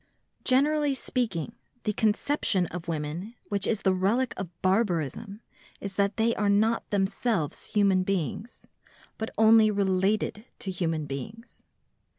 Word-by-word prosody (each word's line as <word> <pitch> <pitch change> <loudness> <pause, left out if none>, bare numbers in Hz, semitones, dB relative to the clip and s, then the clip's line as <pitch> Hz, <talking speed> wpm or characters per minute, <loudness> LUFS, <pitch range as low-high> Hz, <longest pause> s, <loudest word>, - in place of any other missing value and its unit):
Generally 290 +2 +3
speaking, 230 -7 -2 0.3
the 210 - 0
conception 215 -2 +1
of 180 0 -7
women 165 +7 -4
which 200 -1 0
is 220 -2 0
the 190 - +3
relic 220 +7 +1
of 190 -3 -5
barbarism 195 - 0 0.4
is 200 -1 -6
that 200 +1 +1
they 230 +1 +3
are 205 -1 +1
not 220 +3 +2
themselves 195 - -1
human 200 -3 +3
beings, 195 - -3 0.5
but 220 - -2
only 220 0 +6
related 200 +2 0
to 195 - -4
human 165 -4 -1
beings. 145 - -8
200 Hz, 130 wpm, -27 LUFS, 185-225 Hz, 0.5 s, only